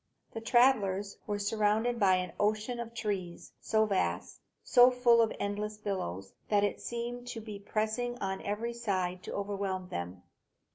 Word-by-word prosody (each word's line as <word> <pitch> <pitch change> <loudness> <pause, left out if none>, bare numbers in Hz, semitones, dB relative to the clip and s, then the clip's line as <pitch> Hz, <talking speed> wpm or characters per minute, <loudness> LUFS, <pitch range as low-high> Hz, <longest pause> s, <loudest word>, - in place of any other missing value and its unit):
The 225 - -6
travellers 220 -5 +3
were 205 -1 -1
surrounded 215 +3 +1
by 190 -3 +5
an 180 -2 -2
ocean 215 +3 0
of 235 0 -6
trees, 195 -6 -4
so 220 0 +2
vast, 200 -3 -1 0.2
so 245 0 +7
full 245 -2 +4
of 225 - +2
endless 210 +1 -3
billows, 95 - -4 0.2
that 205 -1 +3
it 205 - -1
seemed 240 +1 -4
to 240 -2 -5
be 215 -2 -8
pressing 220 +4 -2
on 190 -3 -3
every 220 +4 -2
side 185 -6 -2
to - - -7
overwhelm 195 -2 -3
them. 90 +1 -5
210 Hz, 155 wpm, -31 LUFS, 195-235 Hz, 0.2 s, so